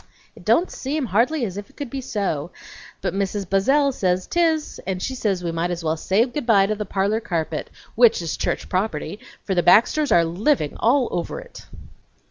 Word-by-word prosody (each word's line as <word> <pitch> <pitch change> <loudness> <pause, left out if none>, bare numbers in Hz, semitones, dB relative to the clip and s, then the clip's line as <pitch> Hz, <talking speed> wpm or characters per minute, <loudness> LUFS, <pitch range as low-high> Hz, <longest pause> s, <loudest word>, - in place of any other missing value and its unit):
It - - -14
don't 355 - +2
seem 285 +1 -3
hardly 240 +6 +1
as 190 -2 -6
if 205 0 -7
it - - -24
could 285 -5 -6
be 270 - -4
so, 190 - -2 0.5
but - - -2
Mrs. 195 0 -2
Buzzell 270 +10 +3
says 185 -4 0
tis, 325 -3 0
and 190 -1 -2
she 260 - -3
says 200 -8 -1
we 170 - -1
might 165 +1 -1
as 175 -1 -4
well 160 0 0
say 195 +7 +2
good 260 0 -5
by 200 -4 +5
to 210 - 0
the 210 -1 -5
parlor 200 +3 0
carpet, 165 -7 -3 0.2
which 235 -1 +5
is 165 -2 -3
church - - -2
property, 185 -1 -2 0.2
for 195 - -2
the 175 - +2
Baxters 235 - +4
are 170 -1 +5
living 175 - 0
all 245 +2 +3
over 175 - -3
it!" - - -13
205 Hz, 200 wpm, -22 LUFS, 180-260 Hz, 0.5 s, by